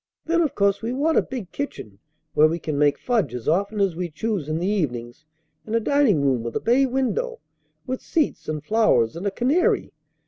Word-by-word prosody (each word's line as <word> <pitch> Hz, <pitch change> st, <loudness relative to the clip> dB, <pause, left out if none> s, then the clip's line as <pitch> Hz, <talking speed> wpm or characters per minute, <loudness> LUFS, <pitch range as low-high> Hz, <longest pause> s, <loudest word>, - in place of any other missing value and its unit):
Then 335 Hz, +1 st, +2 dB
of 310 Hz, -5 st, 0 dB
course 200 Hz, 0 st, +2 dB
we 230 Hz, +2 st, -2 dB
want 305 Hz, +5 st, +2 dB
a -, -, +3 dB
big 240 Hz, -8 st, -7 dB
kitchen 110 Hz, -, -6 dB, 0.3 s
where 155 Hz, -, +6 dB
we 165 Hz, +2 st, -1 dB
can 155 Hz, -2 st, -4 dB
make 145 Hz, 0 st, +3 dB
fudge 215 Hz, -, 0 dB
as 120 Hz, -, -7 dB
often 200 Hz, +6 st, +1 dB
as 195 Hz, -4 st, +1 dB
we 175 Hz, 0 st, -3 dB
choose 165 Hz, 0 st, -3 dB
in 155 Hz, -, -1 dB
the 175 Hz, -, -2 dB
evenings, 145 Hz, -, -2 dB, 0.4 s
and 220 Hz, -, -3 dB
a -, -, +4 dB
dining 230 Hz, -, +2 dB
room 130 Hz, -4 st, +2 dB
with 115 Hz, 0 st, -5 dB
a -, -, +1 dB
bay 260 Hz, +4 st, +3 dB
window, 270 Hz, -, -1 dB, 0.5 s
with 255 Hz, 0 st, -4 dB
seats 310 Hz, -, -1 dB
and 155 Hz, -1 st, -3 dB
flowers 210 Hz, -, +2 dB
and 180 Hz, +4 st, -3 dB
a -, -, 0 dB
canary. 270 Hz, -, +1 dB
200 Hz, 210 wpm, -23 LUFS, 150-255 Hz, 0.5 s, where